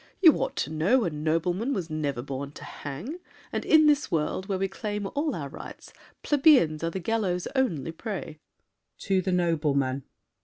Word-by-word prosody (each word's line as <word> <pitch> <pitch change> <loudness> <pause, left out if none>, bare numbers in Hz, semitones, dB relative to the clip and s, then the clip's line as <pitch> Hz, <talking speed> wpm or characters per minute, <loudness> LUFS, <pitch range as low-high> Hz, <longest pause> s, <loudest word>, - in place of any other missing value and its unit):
You 330 -5 +8
ought - - -2
to - - -2
know 185 +11 +3
A 175 - -1
nobleman 165 - 0
was 170 -5 -4
never 145 -5 -2
born 140 +1 -5
to - - -11
hang, 170 - -7 0.3
And - - -2
in 315 -1 +6
this 295 -1 +3
world, 170 +3 -1
where 195 - 0
we 195 +1 0
claim 205 +1 -4
all 290 -1 0
our 145 -4 -4
rights, - - -10 0.3
Plebeians 265 - +4
are 165 - +1
the 190 - -4
gallows' 185 -3 -1
only 170 - 0
prey. 175 -4 -6 0.6
[To 190 -1 +1
the 185 +1 -1
noblemen. 150 -6 +1
180 Hz, 170 wpm, -27 LUFS, 155-225 Hz, 0.6 s, You